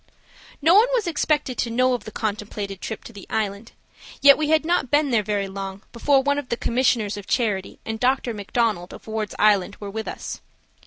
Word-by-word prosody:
No 330 +3 +6
one 430 +5 +7
was 465 - 0
expected 300 -5 0
to 235 - 0
know 255 +2 +2
of 240 -4 -3
the 215 - -7
contemplated 205 -2 -4
trip 220 - -5
to 235 - -11
the 200 -2 -11
Island, 215 0 -3 0.5
yet 280 0 +8
we 305 -1 -1
had 315 0 +3
not 340 -6 +1
been 290 0 +2
there 230 -3 +3
very 205 -1 -1
long 195 0 -6
before 270 +3 +3
one 285 +1 +1
of 280 - -8
the 235 - -1
commissioners 235 -4 +1
of 205 - -9
charity 210 -6 -1
and 220 0 -4
Dr. 250 -1 +1
MacDonald, 205 -3 -1
of - - -14
Ward's 220 -1 -4
Island, 205 -2 +3
were 205 -1 -6
with 220 +1 -5
us. - - -6
225 Hz, 205 wpm, -23 LUFS, 205-270 Hz, 0.5 s, yet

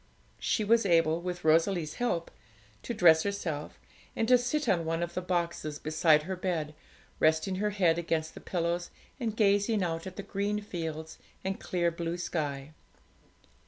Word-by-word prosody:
She 215 - 0
was 230 +2 +4
able, 165 -3 +3
with 180 0 -5
Rosalie's 165 0 +2
help, 175 -9 -1 0.5
to - - -5
dress 165 -5 +6
herself 170 -7 -4 0.4
and 225 - 0
to 250 - +8
sit 265 +4 -1
on 175 -6 +2
one 165 +1 -1
of 170 - -4
the 185 - -2
boxes 170 -4 -2
beside 155 0 +3
her 190 +3 -3
bed, 170 -5 -2 0.5
resting 160 +4 +2
her 210 +2 +1
head 180 -5 +2
against 160 -2 -1
the - - -10
pillows, 175 0 -2 0.3
and 225 -4 -3
gazing 205 0 +3
out 165 0 -3
at 185 - -8
the 200 - -6
green 205 +2 -1
fields 160 -5 -6 0.2
and 190 0 -2
clear 175 -2 0
blue 170 +1 -3
sky. 150 -4 -3
175 Hz, 160 wpm, -30 LUFS, 160-200 Hz, 0.5 s, to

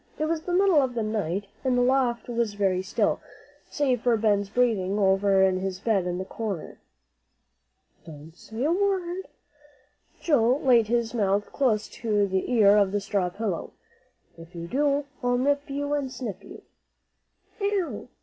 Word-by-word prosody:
It 310 - -1
was 320 0 -1
the 355 - -5
middle 370 -4 +4
of 255 -2 -2
the 230 - -1
night, 205 -3 -2 0.2
and 255 -2 +1
the 245 - +3
loft 250 -2 +1
was 235 -3 -1
very 190 -2 +1
still, 190 - 0 0.5
save 260 -5 0
for 240 -2 +2
Ben's 205 -2 +1
breathing 210 -5 +1
over 195 -1 +3
in 185 -1 +2
his 190 -1 -4
bed 200 -4 0
in 180 0 -2
the 190 - -4
corner. 205 -5 -5 1.2
"Don't 160 0 -12
say 220 +6 -6
a 305 - +2
word!" 375 -1 -1 0.9
Joel 260 -4 +2
laid 240 -5 +4
his 235 0 0
mouth 205 -2 0
close 220 -6 +1
to 210 -3 0
the 190 +3 -2
ear 210 -4 +5
on 200 -2 +4
the 205 +1 -1
straw 200 -2 -1
pillow; 195 -2 -4 0.7
"if 165 +2 -13
you 170 0 -6
do, 285 +6 0 0.2
I'll 245 -1 +1
nip 285 +3 0
you 285 +1 -2
and 280 -3 -2
snip 210 -7 -6
you." - - -12
225 Hz, 160 wpm, -26 LUFS, 195-265 Hz, 1.2 s, ear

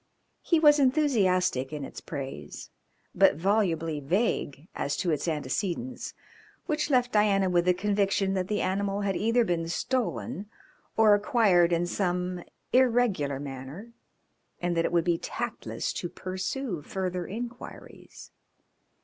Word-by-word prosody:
He 335 - +2
was 295 -1 +6
enthusiastic 200 - +2
in 150 -2 -4
its - - -9
praise, 135 -1 -7 0.4
but - - +5
volubly 165 -4 0
vague 150 - -1
as 140 - -2
to 180 -3 0
its 155 +2 -1
antecedents, 170 - -3 0.5
which 300 -1 -1
left 250 -3 +2
Diana 200 -3 +3
with 175 -1 +3
the 180 0 +4
conviction 195 0 +1
that 185 -1 -1
the 210 0 -1
animal 200 +1 -1
had 195 -2 0
either 230 +4 +2
been 170 -3 -1
stolen 195 - -2 0.5
or 220 -1 +6
acquired 205 -5 +3
in 170 0 +2
some 180 -1 -2 0.3
irregular 230 - +2
manner 140 - -8 0.7
and 175 -1 -1
that 165 - +2
it - - -1
would 170 -1 +2
be 170 -1 +1
tactless - - -4
to 175 - -4
pursue 185 - -4
further 180 +1 -3
inquiries. 240 +4 -9
185 Hz, 130 wpm, -28 LUFS, 170-220 Hz, 0.7 s, was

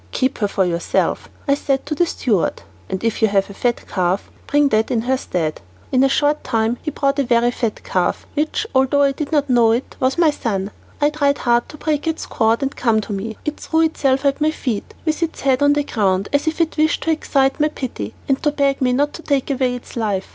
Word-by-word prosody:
"Keep 260 +1 0
her 205 - +2
for 195 -1 +1
yourself," 170 -1 -1 0.2
I 280 - +4
said 275 -1 -1
to 295 - -2
the 345 +3 +2
steward, 215 - 0 0.3
"and 190 +1 -3
if 230 0 -1
you 220 - +5
have 200 -1 +1
a - - -9
fat 240 +3 -1
calf, 185 +1 -1 0.2
bring 290 -1 +3
that 215 -1 +2
in 230 - +1
her 255 +3 +1
stead." 165 -11 -3 0.3
In 255 0 +4
a 270 - +4
short 295 +2 +1
time 225 0 0
he 310 - -3
brought 280 -1 0
a - - +3
very 240 -1 +2
fat 230 -3 -3
calf, 180 -1 -1
which, 310 +7 -1
although 265 +2 +3
I 280 - +4
did 285 +2 -5
not 290 -2 +2
know 240 -3 +4
it, 240 +3 -3
was 260 +3 +1
my 330 -3 +4
son. 205 -8 -3 0.3
It 295 +1 +3
tried 285 -2 +2
hard 240 -1 +1
to 300 - -10
break 300 +1 -1
its 320 0 -2
cord 225 +3 +1
and 275 - -2
come 230 -3 +2
to 210 - -6
me. 215 +3 -4
It 300 - -3
threw 320 0 +1
itself 280 -4 +1
at 280 +1 +1
my 305 - +4
feet, 250 -9 -4
with 315 +1 0
its 330 -1 -2
head 265 -1 +2
on 285 0 +5
the 290 0 +1
ground, 195 -6 0
as 285 +3 +1
if 315 +1 -1
it 330 -1 0
wished 310 0 +2
to 325 - +1
excite 275 -3 +1
my 300 - +4
pity, 230 - -5
and 270 -1 +1
to 300 - +2
beg 280 -2 0
me 250 -1 +2
not 290 +3 +1
to - - -8
take 280 -3 0
away 255 -2 0
its 245 - -10
life. 205 -5 -1
265 Hz, 240 wpm, -20 LUFS, 225-290 Hz, 0.3 s, you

